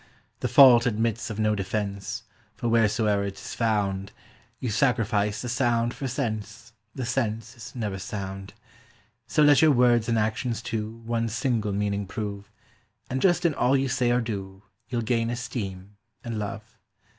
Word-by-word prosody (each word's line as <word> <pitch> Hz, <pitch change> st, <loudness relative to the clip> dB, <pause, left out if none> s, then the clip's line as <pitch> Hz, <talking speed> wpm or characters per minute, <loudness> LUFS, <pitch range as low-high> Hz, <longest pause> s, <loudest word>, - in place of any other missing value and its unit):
The -, -, -1 dB
fault 125 Hz, -3 st, +7 dB
admits 115 Hz, 0 st, -1 dB
of 110 Hz, -, -5 dB
no 110 Hz, 0 st, +2 dB
defence, 100 Hz, +2 st, -3 dB, 0.3 s
for 120 Hz, -, -3 dB
wheresoe'er 110 Hz, -3 st, +2 dB
'tis 100 Hz, +1 st, -8 dB
found, 100 Hz, -4 st, 0 dB, 0.5 s
You 125 Hz, -, -2 dB
sacrifice 110 Hz, -4 st, +1 dB
the -, -, -4 dB
sound 120 Hz, -1 st, +1 dB
for 135 Hz, -, -4 dB
sense; 110 Hz, -3 st, -4 dB, 0.2 s
the 130 Hz, -, -3 dB
sense 115 Hz, -2 st, -2 dB
is 120 Hz, 0 st, -11 dB
never 105 Hz, -5 st, -3 dB
sound. 95 Hz, -1 st, -6 dB, 0.7 s
So 150 Hz, -, +3 dB
let 145 Hz, -2 st, +6 dB
your 160 Hz, -, +6 dB
words 120 Hz, -4 st, +4 dB
and 115 Hz, -, +2 dB
actions, 110 Hz, +2 st, -1 dB
too, 115 Hz, 0 st, -4 dB
one 115 Hz, 0 st, -1 dB
single 115 Hz, -2 st, 0 dB
meaning 100 Hz, 0 st, -1 dB
prove, 100 Hz, 0 st, -5 dB, 0.6 s
And 130 Hz, +1 st, -1 dB
just 175 Hz, -1 st, +3 dB
in 165 Hz, -, +3 dB
all 135 Hz, -1 st, +3 dB
you 135 Hz, 0 st, 0 dB
say 125 Hz, 0 st, +1 dB
or 120 Hz, +1 st, +3 dB
do, 100 Hz, -3 st, -5 dB, 0.3 s
you'll 120 Hz, -2 st, -1 dB
gain 115 Hz, 0 st, +1 dB
esteem 105 Hz, -5 st, -5 dB, 0.3 s
and 115 Hz, -3 st, -4 dB
love. 105 Hz, +2 st, -6 dB
115 Hz, 155 wpm, -26 LUFS, 105-120 Hz, 0.7 s, fault